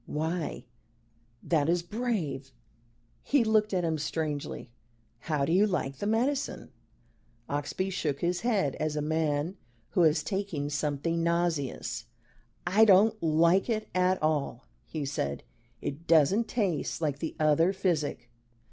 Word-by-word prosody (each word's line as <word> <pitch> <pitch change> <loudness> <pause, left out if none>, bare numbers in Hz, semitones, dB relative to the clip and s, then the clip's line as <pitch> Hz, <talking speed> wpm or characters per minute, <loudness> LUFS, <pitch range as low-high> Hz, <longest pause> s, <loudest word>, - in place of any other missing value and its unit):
Why 160 0 -3 0.8
that 155 -2 +1
is 170 0 +2
brave 175 - -3 0.3
" 115 - -36 0.3
he 280 -4 +2
looked 215 -1 +2
at 185 -2 0
him 160 -2 0
strangely, 150 -4 -3 0.5
"How 150 -2 -1
do 160 - -1
you 195 +5 +5
like 140 -8 -2
the 205 - -3
medicine?" 265 +6 -1 0.8
Oxbye 145 +7 -2
shook 150 -6 -2
his 175 +1 0
head 205 - +1
as 155 -1 -1
a 150 - -1
man 155 +2 0 0.3
who 180 - +2
has 155 -2 +4
taken 165 -6 -3
something 150 +3 -1
nauseous. 165 -8 -1 0.6
"I 195 +5 +5
don't 215 +1 +5
like 170 +6 +3
it 215 -2 -1
at 185 0 +2
all," 155 -2 0 0.2
he 150 -3 -4
said. 70 - -3 0.4
"It 150 +5 -5
doesn't 170 +8 +4
taste 195 - -1
like 145 -4 -1
the 160 - -4
other 155 +3 +4
physic." 160 -10 -1
165 Hz, 140 wpm, -29 LUFS, 150-190 Hz, 0.8 s, you